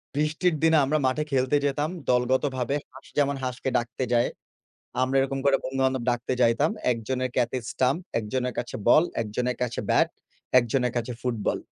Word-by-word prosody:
বৃষ্টির 155 +3 +1
দিনে 160 0 +5
আমরা 155 +3 +1
মাঠে 150 +4 0
খেলতে 130 +1 +2
যেতাম 145 +2 0 0.2
দলগতভাবে 130 +1 +1 0.2
হাঁস 135 - -14
যেমন 140 -1 +2
হাঁসকে 125 +1 -2
ডাকতে 120 +2 -3
যায়। 120 0 +3 0.7
আমরা 130 +1 +1
এরকম 135 0 -1
করে 140 -1 +5
বন্ধুবান্ধব 130 -1 0
ডাকতে 120 +1 -2
যাইতাম। 120 +6 +3 0.2
১ 120 - +1
জনের 130 -1 -1
কাছে 125 0 +1
স্ট্যাম্প, 130 +6 +1 0.2
১ 115 - -3
জনের 125 -1 -1
কাছে 120 - -3
বল, 155 +7 +7 0.2
১ 115 - -2
জনের 125 0 0
কাছে 120 -2 -2
ব্যাট, - - +4 0.5
১ 125 - +3
জনের 125 -3 +1
কাছে 120 +1 -2
ফুটবল। 120 -4 -1
130 Hz, 175 wpm, -26 LUFS, 125-140 Hz, 0.7 s, বল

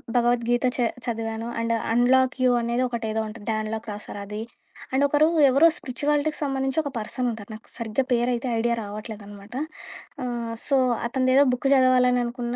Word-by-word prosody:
భగవద్గీత 240 0 +2
చ - - -7 0.3
చదివాను. 225 -1 -3
And 230 0 0 0.2
'unlock 255 +2 +4
you' 250 -1 +4
అనేది 235 +2 0
ఒకటేదో 225 -2 -3
ఉంటుంది 215 -1 -10
'డ్యాన్ 215 -1 -1
లాక్' 220 +1 -5
రాసారది. 205 0 -6 0.5
అండ్ 270 +2 +3
ఒకరు 295 +2 +4 0.2
ఎవరో 275 +6 +6
స్పిరిచువాలిటీకి 295 +3 -1
సంబంధించి 270 -1 -1
ఒక 290 - -4
పర్సన్ 245 +3 -2
ఉంటారు 220 -2 -9
నాకు 215 +1 -11
సరిగ్గా 230 +2 -1
పేరైతే 245 +1 +1
ఐడియా 235 +1 +1
రావట్లేదనమాట. 205 0 -9 0.7
ఆహ్, 235 -2 -3
సో, 275 - +3 0.3
అతనిదేదో 255 +2 +3
బుక్ 250 +2 -1
జదవాలని 255 -1 +4
అనుకున్న. 240 0 -4
240 Hz, 150 wpm, -24 LUFS, 225-255 Hz, 0.7 s, ఎవరో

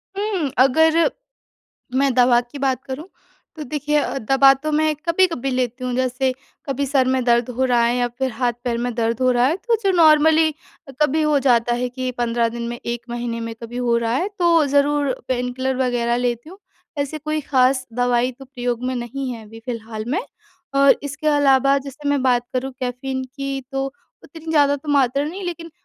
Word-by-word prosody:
हुँ। 395 -7 -1
अगर 320 - +4 0.9
मैं 270 +1 +2
दवा 245 -1 +5
की 245 +4 -11
बात 265 -1 0
करूँ 280 +6 -7 0.5
तो 310 - -6
देखिए 295 +2 0 0.2
दवा 270 +3 +5
तो 295 +3 -4
मैं 310 0 +2
कभी-कभी 335 -6 +1
लेती 255 0 -2
हूँ। 250 - -2
जैसे 255 +1 0 0.3
कभी 280 0 -1
सर 265 -1 +2
में 260 0 +1
दर्द 235 0 +2
हो 260 - +1
रहा 245 -2 +3
है 240 +1 +1
या 245 -1 +1
फ़िर 260 +2 -3
हाथ-पैर 240 0 -2
में 245 +1 -2
दर्द 230 0 -1
हो 255 0 +3
रहा 245 0 +3
है, 310 +6 +1
तो 460 +4 0
जो 390 - +4
नॉर्मली 315 -1 +5 0.5
कभी 300 +2 +2
हो 300 -1 +3
जाता 240 -3 +2
है 250 +1 -1
कि 255 +1 -4
15 235 -1 +1
दिन 235 +1 -6
में, 240 0 -5
1 235 0 -3
महीने 235 -1 -3
में 230 0 -5
कभी 230 +1 -7
हो 245 -1 +1
रहा 230 -1 -1
है, 315 +11 0
तो 340 -3 +4
ज़रूर 285 0 +2 0.2
पेनकिलर 255 +1 -1
वग़ैरह 240 -1 0
लेती 240 +2 -2
हूँ। 380 - -13 0.4
ऐसी 285 +2 -2
कोई 305 +1 -2
ख़ास 260 -2 +2
दवाई 245 +1 +1
तो 270 - -10
प्रयोग 245 -2 -4
में 255 +1 -1
नहीं 255 +2 -4
है 230 -2 -8
अभी 225 +2 -13
फ़िलहाल 225 -3 -5
में। 310 +10 0 0.5
और 275 0 +5
इसके 285 +2 -6
अलावा 275 -2 +4
जैसे 280 +2 -7
मैं 285 -2 +1
बात 245 -2 +2
करूँ 260 +1 -2
कैफीन 260 +1 -3
की 275 -1 -3
तो 270 0 -1 0.4
उतनी 325 -1 -9
ज़्यादा 285 -2 +3
तो 285 +2 -12
मात्रा 275 0 +2
नहीं, 355 +6 -6
लेकिन 340 -1 -6
260 Hz, 195 wpm, -21 LUFS, 245-290 Hz, 0.9 s, दवा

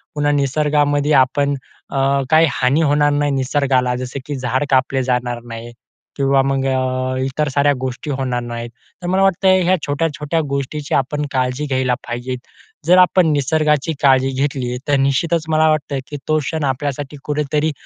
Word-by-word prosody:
पुन्हा 145 0 +1
निसर्गामध्ये 145 +1 +1
आपण 140 +1 +3 0.4
अ, 135 0 +1
काही 160 +1 +5
हानी 135 +5 +1
होणार 145 -1 +3
नाही 145 0 +1
निसर्गाला, 130 -2 +1
जसं 125 +2 -5
की 145 - -4
झाडं 130 +2 -1
कापले 130 0 +2
जाणार 125 -1 -1
नाही 115 +1 -8 0.5
किंवा 135 -1 +3
मग 135 0 0
अ, 130 0 -1
इतर 145 +3 -1
साऱ्या 140 +1 +2
गोष्टी 130 +3 -4
होणार 130 -2 -2
नाहीत, 120 0 -6 0.3
तर 175 - -5
मला 190 +2 +1
वाटतं 195 0 +2 0.2
ह्या 185 +2 +3
छोट्या-छोट्या 150 +1 -1
गोष्टीची 140 +1 -3
आपण 145 +2 -1
काळजी 130 +2 -1
घ्यायला 130 -3 0
पाहिजेत. 120 +2 -4 0.5
जर 180 +1 +6
आपण 180 -1 +5
निसर्गाची 150 +2 +1
काळजी 135 -1 +4
घेतली. 130 -4 -2
तर 145 - +3
निश्चितच 155 +5 +1
मला 155 0 +3
वाटतं 145 -3 -1
की 145 - -6
तो 155 0 +2
क्षण 155 +2 -3
आपल्यासाठी 140 +1 -3
कुठेतरी 150 +1 -1
140 Hz, 160 wpm, -18 LUFS, 130-150 Hz, 0.5 s, जर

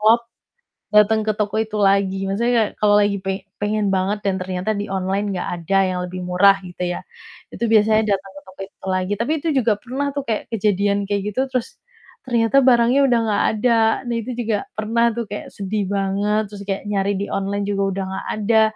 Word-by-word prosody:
klop, 230 +2 +4 0.7
dateng 215 +1 +5
ke 215 - +2
toko 210 +1 -1
itu 220 -1 -4
lagi. 195 -1 +2
Maksudnya 235 +5 +1
kayak 215 - +2
kalau 205 -1 +4
lagi 205 0 +1
pe 190 0 -4 0.2
pengen 210 0 0
banget 195 +2 0
dan 195 -1 +1
ternyata 185 +2 -3
di 205 - -3
online 195 +2 -1
nggak 180 - -3 0.2
ada 195 +3 +2
yang 180 -1 -2
lebih 180 0 -6
murah, 185 +2 +5
gitu 175 0 -8
ya, - - -5 0.5
itu 235 - -3
biasanya 220 0 +4
datang 195 0 -14
ke - - -9
toko 190 +1 -15
itu - - -15
lagi, 185 +1 -1
tapi 245 +6 0
itu 335 - -1
juga 230 -3 +2
pernah 270 +3 -2
tuh 285 - -1
kayak 220 - 0
kejadian 200 -1 +1
kayak 200 -1 0
gitu, - - 0
terus 250 -2 -3 0.5
ternyata 235 +1 +2
barangnya 245 +1 +4
udah 240 - +3
nggak 205 -2 +1
ada 225 +3 +1 0.4
dan 240 - -2
itu 230 +2 -4
juga 220 -3 -1
pernah 230 +2 +1
tuh 235 - -2
kayak 205 - -6
sedih 200 +1 -2
banget, 200 +2 0
terus 205 -1 -8
kayak 195 -1 -2
nyari 200 0 +1
di 200 - -2
online 200 +1 -1
juga 200 -1 0
udah 195 0 -3
nggak 190 0 -5
ada. 220 +1 +3
205 Hz, 200 wpm, -21 LUFS, 195-220 Hz, 0.7 s, dateng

